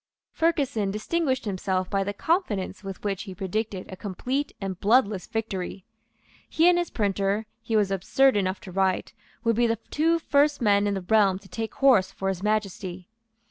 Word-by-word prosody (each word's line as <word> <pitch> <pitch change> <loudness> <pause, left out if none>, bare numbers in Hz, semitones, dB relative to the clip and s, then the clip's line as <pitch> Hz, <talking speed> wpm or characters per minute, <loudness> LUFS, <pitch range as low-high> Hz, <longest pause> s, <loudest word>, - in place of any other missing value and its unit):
Ferguson 280 -11 +1
distinguished 260 +6 -1
himself 185 -2 -1
by 195 0 0
the 200 - -2
confidence 205 - -1
with 195 -1 -7
which 200 -2 -2
he 190 -3 -8
predicted 195 +1 -3
a - - -6
complete 245 +9 -3
and 190 -2 -4
bloodless 210 -3 +2
victory. 200 -4 -4 0.6
He 325 +2 +3
and 355 -1 +5
his 350 - -2
printer, 200 0 0 0.2
he 225 0 -2
was 205 -2 +2
absurd 260 +8 +3
enough 190 -1 0
to 185 - -9
write, 190 0 0 0.3
would 230 -1 +2
be 240 +1 +3
the 230 0 0
two 330 +3 +3
first 295 -2 +2
men 205 -3 +3
in 200 - 0
the 195 - -3
realm 195 0 +3
to 195 0 -15
take 225 +2 -5
horse 225 -9 +4
for 195 0 -3
His 190 -2 -3
Majesty. 195 -3 -2
205 Hz, 180 wpm, -26 LUFS, 190-240 Hz, 0.6 s, and